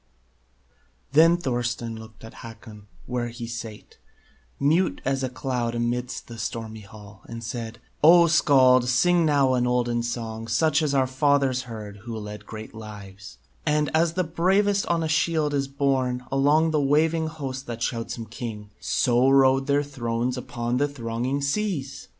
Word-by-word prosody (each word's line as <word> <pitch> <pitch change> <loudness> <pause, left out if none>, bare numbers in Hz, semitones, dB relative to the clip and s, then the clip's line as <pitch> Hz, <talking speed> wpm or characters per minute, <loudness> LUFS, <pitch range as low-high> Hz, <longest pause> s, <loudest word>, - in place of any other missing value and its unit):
Then 165 +4 +6
Thorstein 120 -6 -2
looked 110 0 -12
at 115 - -10
Hakon, 110 -2 -12 0.2
where 125 -1 -2
he 120 0 -7
sate, 115 -2 -8 0.6
Mute 160 +6 +2
as 135 0 0
a 130 - -1
cloud 125 -2 -3
amid 120 +1 -1 0.2
the 115 -1 -10
stormy 110 -1 -5
hall, 105 -1 -14
And 115 0 -7
said: 115 0 -5 0.3
"O, 170 +2 +8
Skald, 130 -6 +4
sing 170 +6 +3
now 140 -3 +3
an 125 -1 +1
olden 120 -1 0
song, 115 -1 -4
Such 150 +7 +2
as 145 -3 0
our 135 -1 +3
fathers 130 -1 +1
heard 105 -3 -8
who 115 +2 -7
led 105 -1 -8
great 110 0 -8
lives; 100 -3 -10 0.3
And, 150 -1 +1
as 165 +1 +2
the 185 +1 0
bravest 195 +5 +1
on 170 -1 +1
a - - -1
shield 155 -1 +1
is 140 -1 0
borne 135 -3 -1
Along 145 +4 +3
the 155 -2 +1
waving 160 +3 +2
host 135 -4 -6
that 120 -1 -4
shouts 115 -1 -3
him 115 - -6
king, 110 -2 -7
So 125 +1 +2
rode 135 0 +4
their 145 0 +2
thrones 120 -3 -2
upon 120 -1 -3
the 145 +2 +2
thronging 130 +1 -3
seas!" 140 -4 -2
125 Hz, 160 wpm, -25 LUFS, 115-145 Hz, 0.6 s, O